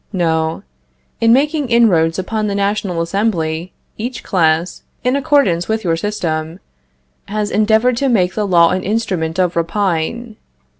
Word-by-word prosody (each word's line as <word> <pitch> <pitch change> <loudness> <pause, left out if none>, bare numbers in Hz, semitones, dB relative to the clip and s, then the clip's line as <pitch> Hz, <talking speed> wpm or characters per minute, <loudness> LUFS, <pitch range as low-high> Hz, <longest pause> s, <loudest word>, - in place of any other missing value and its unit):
No. 160 -4 -1 0.6
In 230 0 +4
making 290 +2 +2
inroads 180 -9 +3
upon 215 +3 -2
the 200 - -2
National 200 -3 -1
Assembly, 170 -3 -2 0.3
each 240 +3 -5
class, 165 -1 0 0.2
in 250 +2 +1
accordance 280 - +2
with 220 0 -1
your 165 -3 +1
system, 165 -3 -3 0.7
has 210 0 -2
endeavored 220 +4 +2
to 275 +2 +1
make 185 -6 +2
the 210 -2 -1
law 170 -3 +4
an 185 +1 -1
instrument 185 -6 -2
of 180 -2 +1
rapine. 195 +6 -2
200 Hz, 140 wpm, -17 LUFS, 170-225 Hz, 0.7 s, In